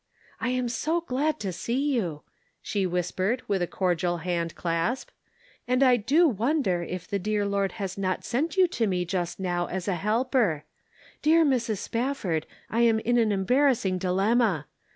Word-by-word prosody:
" - - -29
I'm 250 0 0
so 310 +9 -1
glad 300 0 -1
to 195 -3 -3
see 270 - -1
you 170 - -2 0.2
/' - - -43
she 200 -3 0
whispered, 185 +6 -1
with 195 -3 0
a 175 - 0
cordial 175 -1 0
hand 170 -1 -2
clasp. 170 +9 -1 0.3
" - - -31
And 250 +2 +3
I 255 -2 +6
do 295 +10 +4
wonder 235 - +1
if 180 +1 -5
the 200 - -1
dear 205 +1 0
Lord 200 -2 0
has 195 -1 -5
not 185 -1 -1
sent 305 +10 -1
you 370 -1 +6
to 235 -10 0
me 180 -2 0
just 175 -1 -3
now 175 -2 -1
as 185 -1 -4
a 195 - +1
helper? 210 - +1 0.6
Dear 320 +1 +5
Mrs. 235 -6 +1
Spafford, 230 - -2 0.2
I 230 - -2
am 230 -2 +4
in 240 +2 +1
an 220 -2 +3
embarrassing 205 -1 +2
dilemma. 195 - +2
205 Hz, 175 wpm, -27 LUFS, 180-250 Hz, 0.6 s, I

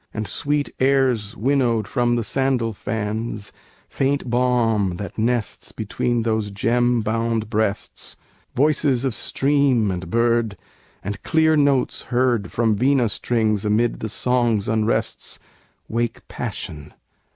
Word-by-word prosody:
And 110 -1 -2
sweet 145 0 0
airs 130 -6 +2
winnowed 120 -3 +1
from 120 -2 +1
the 120 - 0
sandal 130 -2 0
fans, 110 +1 -4 0.4
Faint 135 -2 -1
balm 115 -6 +2
that 100 0 -6
nests 115 0 -1
between 115 +2 -1
those 110 -2 0
gem 120 +4 +1
bound 115 0 -1
breasts, 105 -2 -1 0.4
Voices 140 -2 +2
of 130 - 0
stream 135 -4 +2
and 90 0 -5
bird, 115 -2 +1 0.5
and 100 +1 -5
clear 160 -1 +3
notes 140 -3 +2
heard 120 -4 +1
From 110 -2 +2
vina 125 +1 +2
strings 110 -1 0
amid 110 +3 +1
the 110 - -4
songs' 120 -3 +1
unrests, 110 +1 0 0.5
Wake 115 +1 -2
passion. 75 -1 -6
115 Hz, 120 wpm, -22 LUFS, 110-125 Hz, 0.5 s, clear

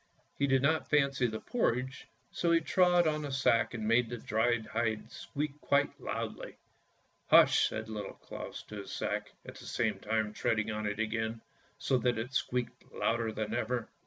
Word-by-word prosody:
He 140 - +1
did 135 -1 +3
not 155 +3 +2
fancy 140 -4 +3
the 110 -1 -4
porridge, 130 - -1 0.2
so 170 - 0
he 165 - +5
trod 175 +1 +3
on 155 -1 +1
the 145 -2 -4
sack 120 -3 +2
and 110 -2 -3
made 115 +1 +3
the 120 - -4
dried 115 +1 +1
hide 110 -1 -2
squeak 150 0 -5
quite 140 0 +1
loudly. - - -5 0.7
"Hush! - - +6
" - - -5
said 110 0 -5
Little 105 -2 -6
Claus - - -8
to 105 - -9
his 100 - -7
sack, - - -3
at - - -9
the - - -11
same - - 0
time 110 0 -1
treading 110 0 0
on 105 0 -2
it 105 0 -2
again, 110 0 -2 0.4
so 130 - +1
that 120 -1 +1
it 120 +4 -4
squeaked 125 -1 -2
louder 115 -1 0
than 110 -1 -3
ever. 120 0 -1
120 Hz, 185 wpm, -32 LUFS, 110-140 Hz, 0.7 s, Hush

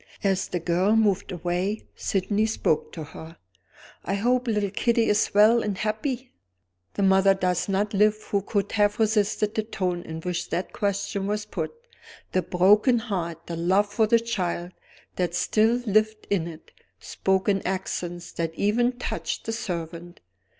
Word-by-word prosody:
As 195 -1 +1
the 180 - -2
girl 180 +5 +2
moved 205 -4 +2
away, 180 +4 -2
Sydney 205 +3 0
spoke 160 -7 0
to 160 - -6
her. 160 +2 -11 0.7
"I 195 - -1
hope 250 +4 +1
little 210 -3 0
Kitty 235 +2 +2
is 210 +1 +2
well 220 +3 +6
and 205 -3 -2
happy?" 235 +5 -2 0.6
The 200 - 0
mother 195 0 +5
does 180 0 0
not 205 +2 0
live 210 +1 +4 0.2
who 200 - +2
could 200 0 -2
have 205 -1 +2
resisted 210 -1 +1
the 220 - 0
tone 185 -5 -2
in 160 -1 -7
which 180 0 -3
that 180 - -3
question 200 -1 -1
was 210 +1 -2
put. - - -4 0.6
The 185 - +2
broken 200 +8 +4
heart, 175 -7 -4
the 170 - -5
love 190 +5 +1
for 220 0 +3
the 230 +1 +5
child 180 -6 -3 0.5
that 175 -2 -1
still 220 +5 +3
lived 215 0 +1
in 175 -5 +1
it, 165 -1 -11 0.3
spoke 190 +1 -1
in 195 -2 +2
accents 175 -2 -4
that 165 -1 -3
even 240 +6 +2
touched 245 - -4
the 225 - -2
servant. 175 -4 -5
200 Hz, 160 wpm, -25 LUFS, 180-215 Hz, 0.7 s, well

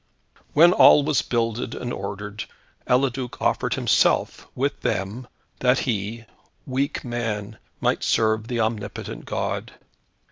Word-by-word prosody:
When 170 +4 +7
all 145 - +7
was 145 -3 +2
builded 115 -1 -2
and 120 -1 -4
ordered, 105 +1 -5 0.4
Eliduc 130 -1 0
offered - - 0
himself, - - +2
with - - -1
them, 105 +7 -2 0.3
that 125 +1 +3
he 115 -1 -3 0.4
weak 135 +2 -2
man 115 -3 -3 0.2
might - - +1
serve 110 0 +1
the 120 -1 -1
omnipotent 110 -2 -4
God. - - -3
115 Hz, 115 wpm, -24 LUFS, 105-125 Hz, 0.4 s, When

